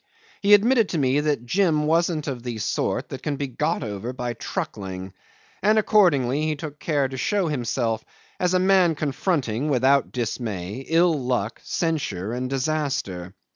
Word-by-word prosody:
He 205 0 +7
admitted 230 +1 +3
to 170 - -2
me 135 -1 +2
that 150 -5 0
Jim 160 0 +2
wasn't 165 0 +1
of 130 -4 -4
the 120 -2 -5
sort 105 - -1
that - - -6
can 145 - -2
be 140 - -2
got 125 - -1
over 110 +3 -4
by 125 -2 -3
truckling, 95 -4 -5 0.5
and 215 +2 +4
accordingly 155 - +3
he 155 - 0
took 150 -1 -8
care 145 -4 +1
to 130 0 -7
show 190 +6 0
himself 120 -4 -1 0.4
as 180 0 +2
a - - +6
man 185 -3 +4
confronting 145 - -1
without 135 +1 +3
dismay 110 -2 -4
ill 170 +1 +4
luck, 120 -3 -1
censure, 120 - -2
and 125 +1 -3
disaster. 130 - -2
140 Hz, 160 wpm, -24 LUFS, 120-165 Hz, 0.5 s, He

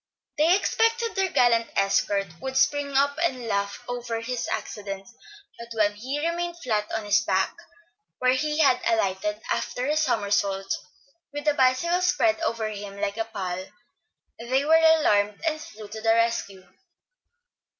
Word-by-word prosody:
They 330 +4 +5
expected 455 +3 +1
their 385 -1 +1
gallant 235 -5 +3
escort 195 0 +1 0.2
would 265 0 -3
spring 285 0 +2
up 285 +2 +2
and 255 -8 -1
laugh 200 -1 -2
over 240 -2 -3
his 235 +1 -3
accident; 195 -2 -5 0.5
but 235 0 -9
when 205 -1 +3
he 265 +9 -3
remained 345 0 -3
flat 220 -10 -1
upon 220 -1 -3
his 205 +1 +3
back, 190 -3 0 0.6
where 255 0 +3
he 300 +3 -1
had 260 -4 +4
alighted 210 -1 0
after 250 - -2
a 300 +2 +1
somersault, 200 -8 0 0.6
with 290 +1 -6
the 300 - +4
bicycle 280 +7 +2
spread 345 -2 +2
over 230 -8 -1
him 200 -1 -7
like 200 +1 -2
a 225 - -1
pall, 185 -5 -4 0.8
they 260 +4 0
were 315 - +3
alarmed, 305 -11 +4
and 310 -1 -1
flew 215 -5 -10
to 220 +1 -7
the 225 - 0
rescue. 230 -5 -1
235 Hz, 150 wpm, -25 LUFS, 205-300 Hz, 0.8 s, They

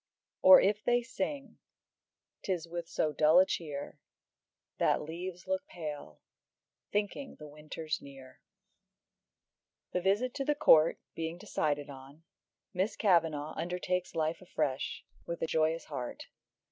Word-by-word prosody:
"Or 280 -1 +10
if 210 +1 +1
they 240 0 +2
sing, 275 +2 -4 0.8
'tis 175 -4 -2
with 170 0 -5
so 155 - 0
dull 155 +3 +5
a 185 - +7
cheer, 150 -6 -5 0.8
That - - +2
leaves 175 +3 -6
look 285 +1 -2
pale, 150 - -7 0.7
thinking 210 +7 -2
the 150 - -11
winter's 155 +1 -5
near." 135 -2 -13 1.5
The 180 - -1
visit 210 +7 +1
to 275 - -2
the 295 +2 +1
Court 165 - +5
being 165 +1 -4
decided 145 -4 -2
on, 135 +4 -13 0.5
Miss 190 +3 0
Kavanagh 160 -6 +2
undertakes 180 +1 -2
life 160 +2 -1
afresh, 150 -7 -2 0.2
with 170 0 -4
a - - +3
joyous 160 +1 +1
heart. 125 -5 -6
165 Hz, 125 wpm, -32 LUFS, 150-195 Hz, 1.5 s, Or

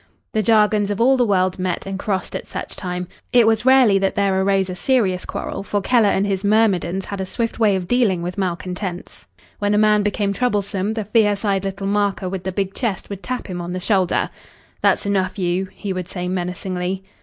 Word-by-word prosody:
The 220 - +2
jargons 210 -1 +3
of 205 - -2
all 260 +3 +5
the 245 -2 +2
world 185 -2 +1
met 185 -1 -2
and 195 0 -4
crossed 195 -2 -2
at - - -5
such - - -6
time. 180 -1 -4 0.2
It 240 -2 +6
was 225 +1 +2
rarely 255 -7 +6
that 195 0 0
there 195 -2 +2
arose 195 -1 +2
a 185 - -4
serious 200 -6 +1
quarrel, - - -4
for 205 +1 -1
Keller 220 +1 +3
and 195 0 +1
his 195 -1 -1
myrmidons 195 -4 +2
had 200 -1 -5
a - - -2
swift 230 +3 -2
way 210 -3 +4
of 180 -2 -3
dealing 205 -7 +2
with 180 +1 -4
malcontents. 180 -1 -4 0.3
When 205 0 +1
a - - +3
man 210 0 +4
became 205 -1 0
troublesome, 205 -3 -1
the 220 -2 -3
fierce 210 -1 +2
eyed 195 -2 +1
little 195 0 -4
marker 200 -1 0
with 185 0 -5
the 190 - -1
big 195 0 -2
chest 220 -5 -3
would 200 -1 -6
tap 255 +3 -4
him 180 -2 -5
on 175 +1 -5
the 185 - -3
shoulder. 185 -2 +1 0.5
"That's - - +2
enough, 195 -1 0
you," 185 0 -1
he 200 -2 -5
would 185 -2 -4
say 180 -2 -4
menacingly. 180 +1 -3
195 Hz, 210 wpm, -21 LUFS, 185-210 Hz, 0.5 s, It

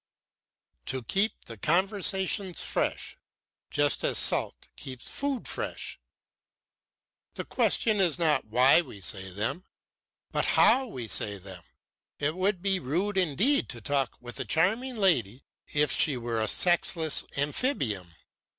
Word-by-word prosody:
"To 130 -2 -3
keep 200 - -1
the 115 - -10
conversations 190 - +1
fresh, - - -2 0.5
just 145 0 0
as - - +1
salt - - +1
keeps 130 -2 -5
food 280 -3 -3
fresh. - - -3 1.4
The - - -5
question 220 -2 +1
is 180 -5 +3
not 160 -3 +1
why 125 +8 +4
we 105 -11 -12
say 95 +2 -2
them, 105 - -3 0.7
but - - 0
how 265 0 +5
we 125 - -7
say 105 0 +2
them. 95 -2 -11 0.6
It 150 +3 -2
would 185 0 -1
be 195 -2 +1
rude 180 +8 -2
indeed 190 - +2
to 120 - -7
talk 135 +2 -1
with 120 0 -9
a - - -1
charming 225 +11 0
lady 135 - +1 0.2
as - - -12
if 150 0 +2
she 145 -5 +2
were 115 -2 -3
a 110 - 0
sexless 170 -3 +2
Amphibium. 140 - -1
155 Hz, 135 wpm, -27 LUFS, 120-195 Hz, 1.4 s, how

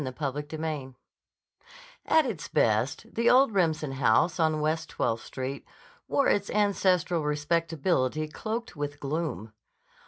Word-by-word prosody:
CHAPTER 135 +2 -3
III 155 -5 -4 1.1
AT 320 -2 +4
its 215 -11 -4
best, 115 +5 0
the 235 +1 +2
old 255 -2 +5
Remsen 160 -6 +1
house 135 +6 +2
on 155 -1 +2
West 155 +2 -1
Twelfth 115 0 -1
Street, 130 +1 -5 0.4
wore 280 - +2
its 200 0 +1
ancestral 185 -5 +2
respectability 155 -1 0
cloaked 220 +9 -5
with 145 -1 -4
gloom. 140 -7 -3
155 Hz, 120 wpm, -28 LUFS, 140-180 Hz, 1.1 s, old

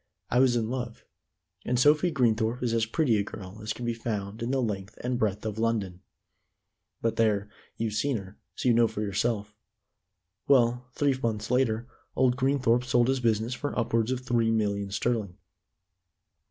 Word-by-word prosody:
I 125 - +3
was 130 -2 +4
in 115 -2 0
love, 120 -2 -5 0.6
and 125 0 0
Sophie 150 +6 +5
Greenthorpe 120 -4 +1
is 120 -2 0
as 115 -1 +1
pretty 120 -2 +2
a 100 - +1
girl 100 0 -9
as 110 0 -3
can 120 - -5
be 120 - 0
found 110 -2 -4
in 115 - -2
the 135 0 +1
length 100 -5 -3
and 125 0 -1
breadth 105 -1 -1
of 110 0 -3
London. 105 -6 -1 1.0
But 115 -1 0
there, 105 -2 +1 0.3
you've 110 -1 -2
seen 130 +4 0
her, 95 0 -10 0.2
so - - -2
you 120 - +6
know 115 0 +5
for 105 - -4
yourself. 105 +1 -1 0.9
Well, 125 -2 +3
three 145 -2 +2
months 110 -1 -2
later, 120 -2 +1 0.3
old 125 -1 +3
Greenthorpe 130 -3 +2
sold 125 -1 +2
his 135 0 +1
business 115 0 +1
for 145 +4 -4
upwards 115 -1 +1
of 130 -1 -2
three 120 -3 +1
million 100 -3 0
sterling. 105 -3 -1
115 Hz, 175 wpm, -28 LUFS, 105-125 Hz, 1.0 s, you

